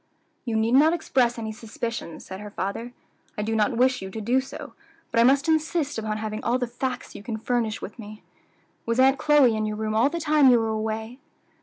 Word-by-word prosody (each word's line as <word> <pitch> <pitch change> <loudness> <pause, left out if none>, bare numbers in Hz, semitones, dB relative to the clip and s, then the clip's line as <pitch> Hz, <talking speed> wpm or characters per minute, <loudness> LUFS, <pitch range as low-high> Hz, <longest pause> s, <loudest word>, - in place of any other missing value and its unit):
"You 230 -3 -2
need 220 +1 +1
not 305 +5 +6
express 255 -8 +1
any 220 -1 -4
suspicions," 225 - -6
said 190 0 -8
her 210 0 -8
father; 205 +5 -4 0.5
"I 210 - -1
do 220 +1 -1
not 220 +2 +1
wish 255 -1 +2
you 190 - -6
to 220 - -6
do 245 +5 +1
so; 265 - -9 0.4
but - - +1
I - - +7
must 275 +4 +4
insist 315 -3 0
upon 215 -1 -3
having 215 0 -4
all 240 +2 +1
the 250 - -1
facts 245 +2 -5
you - - -9
can 220 +1 -4
furnish 225 -1 -2
me - - -1
with. 215 +2 -15
Was 230 +2 0
Aunt 265 +1 +5
Chloe 295 -6 +4
in 215 0 -1
your 210 0 -3
room 215 0 -2
all 230 +5 +3
the 340 - -4
time 300 -4 +4
you 245 - +6
were 225 -1 -1
away?" 220 +3 -3
230 Hz, 220 wpm, -25 LUFS, 215-260 Hz, 0.5 s, I